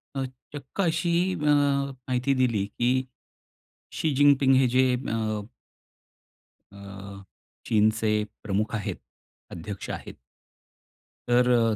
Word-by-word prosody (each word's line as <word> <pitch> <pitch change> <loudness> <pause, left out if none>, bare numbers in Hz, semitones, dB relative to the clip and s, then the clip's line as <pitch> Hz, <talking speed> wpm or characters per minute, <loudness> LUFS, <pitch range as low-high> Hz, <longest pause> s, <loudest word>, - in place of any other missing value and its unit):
अ, 135 - -1 0.3
चक्क 145 +6 -5
अशी 170 -1 +1 0.2
अ, - - -4
माहिती 140 -3 +1
दिली 120 -6 +1
की 120 +4 0 1.0
शी 155 -2 0
जिनपिंग 140 -1 +5
हे 130 0 +4
जे 130 0 +4 0.2
अ 110 -1 -1 1.3
अ, 100 0 -10 0.4
चीनचे 110 0 +2 0.2
प्रमुख 105 +2 -1
आहेत. 105 - -3 0.6
अध्यक्ष 95 +4 -7
आहेत. - - -6 1.1
तर 125 +1 +4
अ 115 -2 +3
120 Hz, 100 wpm, -26 LUFS, 105-135 Hz, 1.3 s, जिनपिंग